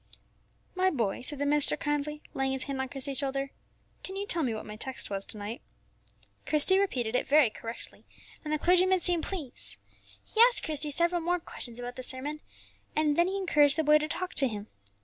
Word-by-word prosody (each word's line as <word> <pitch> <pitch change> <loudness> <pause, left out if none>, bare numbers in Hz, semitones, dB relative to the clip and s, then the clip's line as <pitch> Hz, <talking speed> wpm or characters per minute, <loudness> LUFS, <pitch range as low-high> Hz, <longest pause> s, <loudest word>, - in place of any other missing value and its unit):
"My 370 0 +1
boy," 230 - -2
said 285 +3 0
the 285 - -2
minister 295 0 +2
kindly, 295 0 -3
laying 270 0 -1
his 265 -1 -2
hand 270 -1 -4
on 265 - -5
Christie's 270 0 -3
shoulder, 275 0 -3 0.5
"can 380 - -7
you 400 +1 -2
tell 345 -4 +2
me 255 -6 -1
what 220 - -6
my 210 - -9
text 260 0 -2
was 195 0 -2
to - - -9
night?" 210 +3 -7 0.9
Christie 315 +6 +4
repeated 250 - -2
it - - -1
very 285 -5 +4
correctly, 230 +2 -10 0.4
and 305 - -5
the 305 - +1
clergyman 365 +3 +3
seemed 345 -2 +2
pleased. 315 -10 +1 0.5
He 445 - +1
asked 485 +1 +8
Christie 300 -1 +2
several 340 +4 +3
more 350 +2 -1
questions 240 -7 -8
about 245 +1 -7
the - - -5
sermon, 275 +4 -1 0.6
and 300 -1 +1
then 345 +2 +2
he 385 +1 -3
encouraged 300 -6 +2
the 320 - +1
boy 300 0 +5
to 305 - -3
talk 365 +4 -4
to 275 - +5
him. 210 -2 -7
295 Hz, 205 wpm, -28 LUFS, 260-340 Hz, 0.9 s, asked